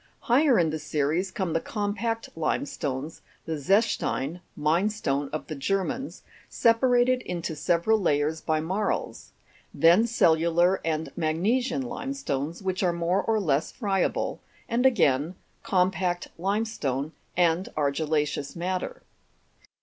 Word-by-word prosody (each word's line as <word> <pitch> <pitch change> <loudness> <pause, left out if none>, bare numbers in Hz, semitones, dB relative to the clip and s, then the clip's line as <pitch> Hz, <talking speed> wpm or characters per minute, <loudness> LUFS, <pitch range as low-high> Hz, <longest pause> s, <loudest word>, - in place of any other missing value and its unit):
Higher 260 +1 +4
in 165 -3 +2
the 155 - -3
series 155 +5 0
come 190 -3 -3
the 165 - +2
compact 220 +2 -2
limestones, 145 -2 -3 0.2
the 160 - -3
zechstein 175 - 0
(mine 160 +7 +2
stone) 145 -10 -2
of 155 - -4
the 155 - -6
Germans, 195 - -2 0.3
separated 245 +2 +3
into 170 -2 -4
several 175 +8 +2
layers 155 -3 +1
by 155 -1 0
marls; 190 +6 -2 0.4
then 175 +8 +5
cellular 170 -3 +3
and 160 -1 -2
magnesian 225 +12 0
limestones, 240 - -4
which 185 -1 -1
are 180 -3 +2
more 170 +3 +1
or 225 -1 +1
Ises 155 -7 0
friable, 195 -5 -1 0.3
and 245 +2 +3
again, 155 - +2 0.3
compact 180 -1 0
limestone 180 - -1 0.3
and 175 +1 +2
argilla'ceous 150 0 0
matter. 185 - -3
175 Hz, 120 wpm, -26 LUFS, 155-215 Hz, 0.4 s, then